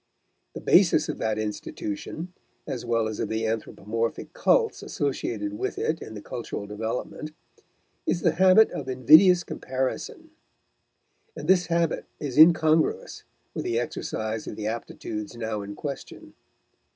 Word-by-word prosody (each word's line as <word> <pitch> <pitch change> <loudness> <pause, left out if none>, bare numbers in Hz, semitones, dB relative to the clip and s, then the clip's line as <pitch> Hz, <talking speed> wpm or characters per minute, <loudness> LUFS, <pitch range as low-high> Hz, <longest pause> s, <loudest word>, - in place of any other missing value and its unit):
The - - -6
basis - - +4
of - - -4
that 110 -1 0
institution, 110 - -5 0.3
as 125 - -4
well 115 -2 +1
as 110 -1 -5
of - - -2
the 110 0 -1
anthropomorphic 115 0 -3
cults - - +2
associated 115 -7 -3
with - - -2
it 160 +1 -1
in 110 - -8
the 105 - -8
cultural 115 -3 -5
development, 110 +8 -5 0.7
is 175 - +1
the 165 - +3
habit 190 +6 +6
of 135 - -5
invidious 155 +8 +6
comparison; 130 - -4 1.1
and - - -6
this 180 -2 +4
habit 170 -1 0
is 140 -4 -4
incongruous 160 0 +4 0.3
with - - -3
the 115 - -1
exercise 110 -2 -4
of - - -5
the 105 - -5
aptitudes 110 -1 -5
now 110 -2 -3
in 100 0 -7
question. 140 +2 -7
120 Hz, 140 wpm, -26 LUFS, 110-160 Hz, 1.1 s, habit